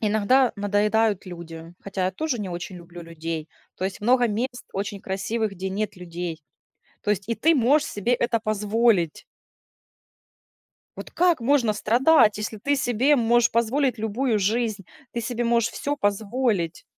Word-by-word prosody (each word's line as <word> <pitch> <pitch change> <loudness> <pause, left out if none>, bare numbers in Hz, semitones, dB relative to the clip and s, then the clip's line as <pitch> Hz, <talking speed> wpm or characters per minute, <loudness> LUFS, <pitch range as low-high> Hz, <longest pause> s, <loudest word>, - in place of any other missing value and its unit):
Иногда 220 +4 +3
надоедают 205 +1 +1
люди, 165 -2 -9
хотя 190 -2 -2
я - - 0
тоже 300 -1 -2
не 195 - -4
очень 180 +1 -6
люблю 170 0 -11
людей. 165 -1 -5 0.3
То 185 - -4
есть 190 0 -4
много 245 +3 +3
мест 245 +4 -3
очень 200 0 -4
красивых, 205 +3 -2
где 190 0 -5
нет 210 +2 -3
людей. 170 -2 -6 0.6
То 210 - -1
есть 205 +1 -1
и 230 - 0
ты 325 +6 +3
можешь 285 +4 +3
себе 220 +4 0
это 235 -2 0
позволить. 215 -4 +1 1.7
Вот - - -8
как 350 -6 +2
можно 235 -4 +2
страдать, 225 0 +4
если 215 +1 -4
ты 285 +7 0
себе 265 +3 +2
можешь 235 0 +3
позволить 245 +2 +1
любую 220 +1 0
жизнь? 215 -1 -1 0.3
Ты 235 - -2
себе 240 +1 -2
можешь 235 -1 +2
всё 290 +1 -3
позволить. 205 - -1
215 Hz, 150 wpm, -24 LUFS, 190-240 Hz, 1.7 s, страдать